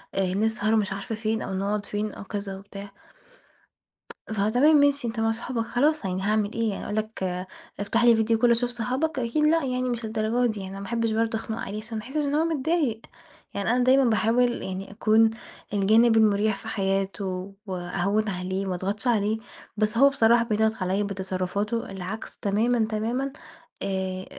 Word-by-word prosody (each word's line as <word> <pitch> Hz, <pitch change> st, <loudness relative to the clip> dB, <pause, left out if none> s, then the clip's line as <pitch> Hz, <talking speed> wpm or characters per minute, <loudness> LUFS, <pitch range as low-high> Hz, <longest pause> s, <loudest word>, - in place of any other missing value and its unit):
آآ، 190 Hz, -2 st, +1 dB
نسهر"، 215 Hz, +1 st, +1 dB
مش 205 Hz, -3 st, +1 dB
عارفة 200 Hz, +3 st, -4 dB
فين 220 Hz, 0 st, -1 dB
أو 195 Hz, -, -4 dB
نقعد 200 Hz, +2 st, -1 dB
فين 210 Hz, +1 st, -3 dB
أو -, -, -9 dB
كذا 200 Hz, -1 st, -5 dB
وبتاع. 200 Hz, 0 st, -10 dB, 1.4 s
فتمام 220 Hz, +9 st, +3 dB
ماشي 285 Hz, -3 st, +3 dB
أنت 225 Hz, 0 st, -4 dB
مع 225 Hz, 0 st, +2 dB
صحابك 230 Hz, 0 st, -3 dB
خلاص 295 Hz, +1 st, +1 dB
يعني 185 Hz, 0 st, -2 dB
هاعمل 210 Hz, +1 st, 0 dB
إيه 230 Hz, -1 st, 0 dB
يعني، 200 Hz, -, -4 dB
أقول 210 Hz, -, -4 dB
لك 215 Hz, -2 st, -3 dB, 0.6 s
افتح 225 Hz, +3 st, +1 dB
لي 240 Hz, -1 st, +7 dB
video 225 Hz, 0 st, +2 dB
call 245 Hz, -, +5 dB
أشوف 240 Hz, +1 st, +2 dB
صحابك؟! 255 Hz, +5 st, -1 dB
أكيد 245 Hz, +5 st, 0 dB
لأ 325 Hz, +1 st, +3 dB
يعني 255 Hz, -1 st, -1 dB
مش 235 Hz, -1 st, -3 dB
للدرجة 220 Hz, +2 st, +1 dB
دي 215 Hz, -, -7 dB
يعني، 190 Hz, -1 st, -6 dB
أنا 195 Hz, -, -7 dB
ما 200 Hz, -, -6 dB
احبّش 230 Hz, 0 st, -1 dB
برضو 225 Hz, 0 st, 0 dB
أخنق 220 Hz, 0 st, -5 dB
عليه 205 Hz, -1 st, -5 dB
عشان 220 Hz, +1 st, -5 dB
ما 215 Hz, -, -5 dB
يحسّش 295 Hz, +4 st, -2 dB
إن 285 Hz, +1 st, 0 dB
هو 315 Hz, +2 st, +2 dB
متضايق، 305 Hz, -6 st, 0 dB, 0.5 s
يعني 200 Hz, +2 st, -1 dB
أنا 245 Hz, 0 st, +2 dB
دايمًا 265 Hz, +2 st, +5 dB
باحاول 235 Hz, +3 st, +2 dB
يعني 190 Hz, +1 st, -5 dB
أكون 220 Hz, +1 st, +4 dB, 0.4 s
الجانب 220 Hz, +3 st, +4 dB
المُريح 215 Hz, -1 st, +3 dB
في 220 Hz, -, -9 dB
حياته 195 Hz, -2 st, -2 dB
وأهوّن 195 Hz, +3 st, -1 dB
عليه 185 Hz, +1 st, -3 dB
وما 185 Hz, -1 st, -2 dB
أضغطش 200 Hz, +7 st, -3 dB
عليه، 215 Hz, -2 st, +2 dB, 0.4 s
بس 215 Hz, +1 st, 0 dB
هو 275 Hz, +3 st, +7 dB
بصراحة 235 Hz, -3 st, +4 dB
بيضغط 220 Hz, -1 st, +1 dB
عليّا 190 Hz, +3 st, 0 dB
بتصرفاته 200 Hz, +3 st, -2 dB
اللي 190 Hz, -2 st, -6 dB
عكس 215 Hz, +5 st, -6 dB
تمامًا، 220 Hz, +3 st, +1 dB
تمامًا، 235 Hz, +5 st, -1 dB, 0.5 s
آآ، 190 Hz, -1 st, -2 dB
220 Hz, 180 wpm, -26 LUFS, 200-235 Hz, 1.4 s, لي